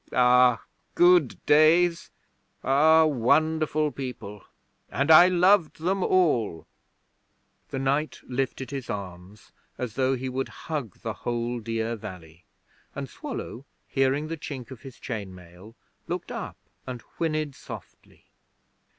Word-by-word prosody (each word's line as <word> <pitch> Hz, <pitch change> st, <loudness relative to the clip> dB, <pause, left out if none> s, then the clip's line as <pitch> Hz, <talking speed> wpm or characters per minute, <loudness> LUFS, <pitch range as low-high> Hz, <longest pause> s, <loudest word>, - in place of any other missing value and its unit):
Ah, 125 Hz, -1 st, +4 dB, 0.3 s
good 175 Hz, -6 st, +5 dB
days! 165 Hz, +3 st, +4 dB, 0.5 s
Ah, 160 Hz, +4 st, +5 dB
wonderful 155 Hz, +3 st, +1 dB
people! 120 Hz, -7 st, -7 dB, 0.5 s
And 140 Hz, +4 st, +1 dB
I 165 Hz, +3 st, +9 dB
loved 180 Hz, -1 st, +3 dB
them 185 Hz, +3 st, 0 dB
all.' 125 Hz, -, +1 dB, 1.0 s
The -, -, -4 dB
knight 140 Hz, +3 st, -1 dB
lifted 130 Hz, +1 st, -3 dB
his 135 Hz, -5 st, -6 dB
arms 95 Hz, +1 st, -8 dB, 0.3 s
as 125 Hz, -4 st, -4 dB
though 130 Hz, +2 st, +1 dB
he 130 Hz, +1 st, -5 dB
would 130 Hz, +1 st, -3 dB, 0.2 s
hug 145 Hz, -, -5 dB
the 115 Hz, -, -3 dB
whole 120 Hz, 0 st, -2 dB
dear 115 Hz, +1 st, -2 dB
valley, 90 Hz, -6 st, -11 dB, 0.5 s
and -, -, -4 dB
Swallow, 125 Hz, -, -7 dB, 0.2 s
hearing 135 Hz, +3 st, +1 dB
the 165 Hz, +1 st, -5 dB
chink 135 Hz, -4 st, -7 dB
of 125 Hz, -3 st, -10 dB
his 135 Hz, -2 st, -11 dB
chain 100 Hz, -6 st, -6 dB
mail, 90 Hz, +5 st, -15 dB, 0.3 s
looked -, -, -4 dB
up -, -, -6 dB, 0.3 s
and 125 Hz, -2 st, -6 dB, 0.2 s
whinnied 155 Hz, -3 st, -1 dB
softly. -, -, -12 dB
130 Hz, 125 wpm, -26 LUFS, 115-155 Hz, 1.0 s, I